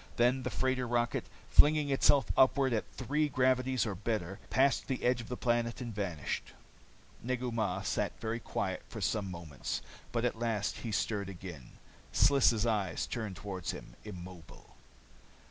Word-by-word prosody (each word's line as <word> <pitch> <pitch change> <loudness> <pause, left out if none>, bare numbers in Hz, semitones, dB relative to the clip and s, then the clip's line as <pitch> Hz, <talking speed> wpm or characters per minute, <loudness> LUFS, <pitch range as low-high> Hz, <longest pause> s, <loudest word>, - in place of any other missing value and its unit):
Then 125 +2 +3
the - - -2
freighter 130 -1 0
rocket, 120 0 0 0.3
flinging 150 -1 +6
herself 140 0 +4
upward 130 -1 +4
at 110 - -2
three 150 +4 0
gravities 130 -1 +2
or 105 - -2
better, 100 -1 -3
passed 135 +1 +3
the 130 - -2
edge 125 0 +2
of 115 - -10
the 125 - -3
planet 120 -1 0
and 120 -3 -5
vanished. 90 -8 -3 0.7
Negu 125 0 -2
Mah 110 -2 -1
sat - - -1
very 115 +1 -2
quiet - - -2
for - - -6
some 100 -3 0
moments. 85 -6 -4 0.3
But 120 0 0
at 115 -2 -1
last 115 -3 -1
he 115 - -5
stirred 105 -2 -1
again. 85 -8 -9 0.4
Sliss' 120 -5 +4
eyes 100 -7 0
turned 110 -6 -4
toward 95 -3 -5
him, - - -6
immobile. 90 -4 -10
115 Hz, 155 wpm, -32 LUFS, 100-130 Hz, 0.7 s, flinging